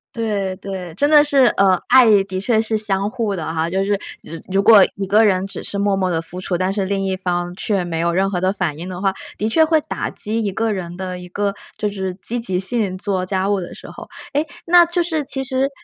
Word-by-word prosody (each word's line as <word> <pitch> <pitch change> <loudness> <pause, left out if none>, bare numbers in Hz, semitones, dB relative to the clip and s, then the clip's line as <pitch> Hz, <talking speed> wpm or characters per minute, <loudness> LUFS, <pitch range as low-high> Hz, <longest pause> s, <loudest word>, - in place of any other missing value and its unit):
对， 205 -5 -2
对， 185 -2 -7
真 285 - +2
的 300 -1 +7
是 285 -2 +2 0.2
呃， 190 -2 +4
爱 230 -6 +6
的 190 -1 -5
确 220 +3 +1
是 220 0 -1
相 200 -2 0
互 215 -3 -2
的 160 -2 -4
哈。 165 +1 -1
就 190 +2 0
是 205 0 +1 0.3
只 165 -1 -9
如 195 +1 +2
果 210 -3 +8
一 195 - -3
个 210 +4 +4
人 190 -3 +2
只 195 - -7
是 200 - -4
默 200 0 +1
默 190 -1 0
地 165 -2 0
付 180 +2 -6
出， 180 -1 -1
但 185 +2 -1
是 200 -1 -1
另 195 0 -1
一 190 -1 -1
方 175 -1 -2
却 195 -1 -1
没 165 -2 -3
有 170 +1 +1
任 190 +3 +1
何 180 -2 -2
的 185 +1 +2
反 185 -7 -2
应 175 +3 -6
的 180 -1 -6
话， 195 -1 +1 0.2
的 215 - -1
确 320 +9 +4
会 315 0 +3
打 - - -4
击 220 +2 -3
一 200 - -1
个 225 +3 -1
人 175 -3 -5
的 185 -1 -5
一 180 0 -11
个 200 +2 -1 0.2
就 210 - -1
是 190 -2 -4
积 230 +5 -3
极 190 -6 -1
性- 195 0 0
做 190 -1 -1
家 190 0 0
务 205 -1 +1
的 175 - -7
时 - - -11
候。 - - -11 0.2
诶， 295 +3 0 0.2
那 350 +1 +7
就 345 +1 0
是 320 -3 -1
其 270 -1 -2
实 265 +1 0
195 Hz, 275 characters per minute, -19 LUFS, 185-220 Hz, 0.3 s, 果